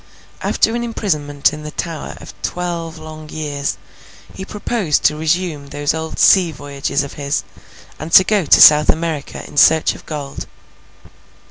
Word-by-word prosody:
After 225 Hz, -, +1 dB
an 240 Hz, -, -2 dB
imprisonment 150 Hz, -12 st, -1 dB
in 150 Hz, -, -7 dB
the 150 Hz, -, -7 dB
Tower 165 Hz, 0 st, -6 dB
of -, -, -11 dB
twelve 170 Hz, -2 st, -4 dB
long 155 Hz, -1 st, -10 dB
years, 145 Hz, -3 st, -4 dB, 0.6 s
he 190 Hz, -, -7 dB
proposed 205 Hz, -5 st, -1 dB
to 150 Hz, -, +3 dB
resume 160 Hz, -2 st, -2 dB
those 145 Hz, +1 st, -2 dB
old 160 Hz, 0 st, -5 dB
sea 180 Hz, -4 st, +5 dB
voyages 140 Hz, -1 st, -3 dB
of 140 Hz, -, -8 dB
his, 140 Hz, +1 st, -1 dB, 0.6 s
and 155 Hz, +2 st, -7 dB
to 190 Hz, -, +9 dB
go 200 Hz, -2 st, +1 dB
to -, -, +6 dB
South 150 Hz, 0 st, +8 dB
America 160 Hz, -3 st, -2 dB
in 145 Hz, -, -13 dB
search 160 Hz, +2 st, +5 dB
of -, -, -13 dB
gold. 145 Hz, -3 st, -6 dB
155 Hz, 155 wpm, -18 LUFS, 145-170 Hz, 0.6 s, to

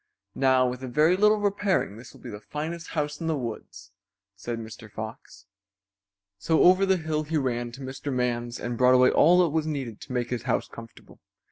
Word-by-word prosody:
"Now 130 Hz, -1 st, +3 dB
with 125 Hz, +1 st, -4 dB
a 130 Hz, -, -5 dB
very 155 Hz, +8 st, +3 dB
little 210 Hz, +2 st, +4 dB
repairing 200 Hz, -, 0 dB
this 120 Hz, +2 st, -12 dB
will -, -, -17 dB
be 125 Hz, -, -8 dB
the 105 Hz, -, -7 dB
finest 165 Hz, +5 st, -5 dB
house 150 Hz, 0 st, -2 dB
in 165 Hz, -, -3 dB
the 160 Hz, -2 st, 0 dB
woods," 120 Hz, -4 st, -7 dB, 0.4 s
said 115 Hz, +4 st, -5 dB
Mr. 110 Hz, -1 st, -9 dB
Fox. 110 Hz, -1 st, -9 dB, 0.9 s
So 160 Hz, +9 st, +2 dB
over 185 Hz, +2 st, +5 dB
the 190 Hz, -1 st, +3 dB
hill 160 Hz, -2 st, -2 dB
he 155 Hz, +1 st, -2 dB
ran 120 Hz, -4 st, -2 dB
to 135 Hz, -, -10 dB
Mr. 135 Hz, +2 st, -5 dB
Man's 120 Hz, -1 st, -2 dB
and 120 Hz, -1 st, -4 dB
brought 125 Hz, 0 st, +6 dB
away 125 Hz, 0 st, +5 dB
all 175 Hz, +4 st, +5 dB
that 170 Hz, -, +1 dB
was 155 Hz, +1 st, -1 dB
needed 135 Hz, -8 st, -4 dB
to -, -, -10 dB
make 125 Hz, -1 st, -2 dB
his 125 Hz, -, -2 dB
house -, -, 0 dB
comfortable. 115 Hz, -1 st, -13 dB
130 Hz, 205 wpm, -26 LUFS, 120-160 Hz, 0.9 s, brought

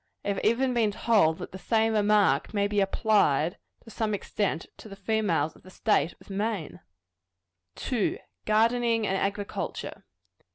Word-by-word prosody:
I -, -, -1 dB
have 200 Hz, -, -1 dB
even 250 Hz, +4 st, +2 dB
been 230 Hz, -3 st, +2 dB
told 205 Hz, -6 st, +2 dB
that 180 Hz, -, -8 dB
the 190 Hz, -, -8 dB
same 225 Hz, +3 st, +1 dB
remark 205 Hz, -7 st, +2 dB
might 200 Hz, 0 st, +1 dB
be 205 Hz, -, +2 dB
applied, 195 Hz, -5 st, +2 dB, 0.2 s
to 225 Hz, -, -13 dB
some 215 Hz, -2 st, -1 dB
extent, 200 Hz, -4 st, -2 dB
to 220 Hz, -, -12 dB
the 195 Hz, -, -9 dB
females 195 Hz, -7 st, 0 dB
of -, -, -19 dB
the 185 Hz, -, -15 dB
state 180 Hz, -5 st, +1 dB
of -, -, -19 dB
Maine. 200 Hz, -4 st, -3 dB, 1.0 s
2. 240 Hz, -6 st, -1 dB, 0.3 s
_Gardening 230 Hz, +1 st, +2 dB
and 195 Hz, -, 0 dB
Agriculture. 200 Hz, +1 st, -3 dB
210 Hz, 155 wpm, -27 LUFS, 190-220 Hz, 1.0 s, even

